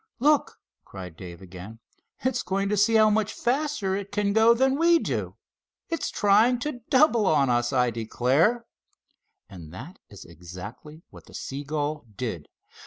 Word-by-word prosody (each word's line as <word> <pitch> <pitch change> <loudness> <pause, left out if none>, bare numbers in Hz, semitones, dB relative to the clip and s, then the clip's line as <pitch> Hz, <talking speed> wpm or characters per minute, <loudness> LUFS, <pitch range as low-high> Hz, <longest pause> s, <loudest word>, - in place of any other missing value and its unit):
"Look!" 295 +3 +2 0.3
cried 90 -4 -10
Dave 90 +1 -10
again. 95 +4 -10 0.4
"It's 260 -1 0
going 195 +2 -2
to 210 - +1
see 210 +3 +3
how 215 -1 +5
much 215 0 0
faster 250 -7 -1
it 200 0 -6
can 205 -1 0
go 225 +2 +5
than 265 +3 +1
we 335 +1 +5
do. - - -3 0.5
It's 330 -1 -2
trying 215 +5 +3
to 275 -3 -4
double 260 -7 +4
on 140 -6 +3
us, 120 +1 +1
I 125 -2 +2
declare!" 130 - +1 0.8
And 90 -6 -12
that 130 - -10
is 100 -5 -12
exactly 90 - -11
what - - -15
the - - -14
seagull 145 0 -4
did. 95 -10 -5
180 Hz, 155 wpm, -25 LUFS, -, 0.8 s, how